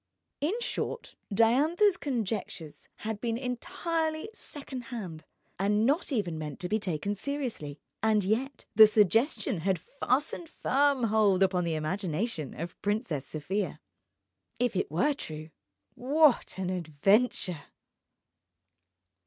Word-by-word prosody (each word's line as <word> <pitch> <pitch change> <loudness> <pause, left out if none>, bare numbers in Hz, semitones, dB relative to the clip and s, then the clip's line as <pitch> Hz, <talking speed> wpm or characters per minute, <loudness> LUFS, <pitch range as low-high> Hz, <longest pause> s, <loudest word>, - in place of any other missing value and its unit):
In 360 +11 0
short, 470 - -3 0.2
Diantha's 295 - +4
conjectures 210 - -4 0.2
had 215 -1 -3
been 230 -1 -1
entirely 315 - -2
second 275 - -7
hand, 190 -10 -6 0.4
and 210 +3 +2
not 295 +6 +1
even 180 - -1
meant 150 -2 -6
to 180 - -2
be 215 +4 +1
taken 190 0 -2
seriously. 220 - -4 0.2
And 215 -1 +3
yet 240 +8 -1
the 220 0 +10
suggestion 215 - +2
had 190 +2 +1
fastened 280 - -2
firm 280 -3 +2
hold 210 -4 +4
upon 185 -2 +2
the 165 -1 0
imagination 160 - -2
of 170 +2 -3
the - - -25
Princess 205 - -2
Sofia. 190 +7 -3 0.8
If 245 -2 0
it 190 - 0
were 180 - +2
true... 155 - -8 0.4
what 285 -1 +3
an 185 -1 -2
adventure! 180 +1 +1
215 Hz, 120 wpm, -29 LUFS, 180-265 Hz, 0.8 s, the